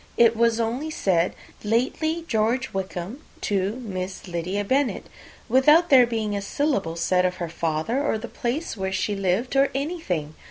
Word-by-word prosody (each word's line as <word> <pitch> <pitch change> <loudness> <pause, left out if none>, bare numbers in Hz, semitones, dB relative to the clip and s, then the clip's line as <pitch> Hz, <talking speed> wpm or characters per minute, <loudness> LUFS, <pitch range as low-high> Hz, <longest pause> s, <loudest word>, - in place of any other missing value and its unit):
It 230 -1 +5
was 230 0 +2
only 240 +7 -1
said, 185 - +1 0.3
'Lately, 295 +9 0
George 230 +4 0
Wickham, 190 +3 -4 0.2
Esq., - - -25
to 195 0 +1
Miss 185 -1 -5
Lydia 180 +4 -2
Bennet,' 265 +4 0 0.4
without 300 +7 +5
there 255 -3 +8
being 220 -3 -2
a 200 - -2
syllable 200 - -1
said 180 +2 +2
of 180 0 0
her 170 -2 -4
father, 165 - -1
or 220 - +1
the 230 +2 -7
place 240 +7 -3
where 190 -2 -3
she 205 +2 -1
lived, 195 +7 0
or 275 0 +4
anything. 270 - -2
220 Hz, 165 wpm, -24 LUFS, 185-260 Hz, 0.4 s, there